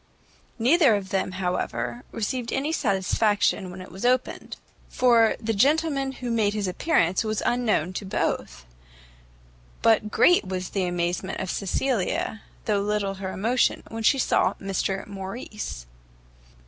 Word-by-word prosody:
Neither 265 0 +5
of 195 -2 -4
them, 190 -1 -1
however, 125 -10 -2
received 230 +2 -3
any 280 +4 -1
satisfaction 205 - +1
when 180 +1 -8
it 185 - -13
was 190 +5 -9
opened, 250 +1 0 0.3
for 235 -3 +4
the 225 0 -1
gentleman 275 +3 +2
who 250 -2 -5
made 215 -2 +1
his 205 -2 -1
appearance 185 - +1
was 215 -1 -2
unknown 220 -8 +1
to 195 - -5
both: 60 - -2 1.2
but 220 -1 +4
great 355 - +4
was 185 -1 -4
the 195 -2 -1
amazement 175 +1 -2
of 185 - -3
Cecilia, 220 +1 -1 0.2
though 205 -2 +1
little 205 -1 -1
her 190 -1 -3
emotion, 235 +7 +1
when 225 0 -5
she 250 +5 +4
saw 260 - +2
Mr 195 0 -2
Morrice! 195 - -6
210 Hz, 135 wpm, -25 LUFS, 190-240 Hz, 1.2 s, Neither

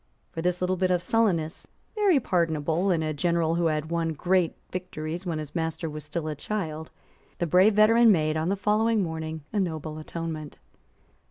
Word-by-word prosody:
For 165 - -4
this 180 +1 0
little 185 +1 +1
fit 185 0 +1
of 180 -1 +3
sullenness, 180 -5 0 0.3
very 405 -8 +3
pardonable 165 - 0
in 165 -3 +2
a 155 0 -1
general 165 +1 +1
who 170 0 +1
had 155 0 -2
won 165 -1 0
great 180 +2 +1 0.2
victories 175 -1 -5
when 165 -2 -1
his 155 -2 -6
master 160 -1 -2
was 150 0 -7
still 155 +1 -4
a 155 - -2
child, 160 -2 -4 0.5
the 175 - 0
brave 185 +6 +4
veteran 225 +2 +6
made, 155 -4 +2
on 160 +2 0
the 195 - +1
following 215 +2 +2
morning, 160 -2 -5
a 210 - +1
noble 155 -4 -3
atonement. 155 -1 -6
170 Hz, 180 wpm, -26 LUFS, 155-185 Hz, 0.5 s, veteran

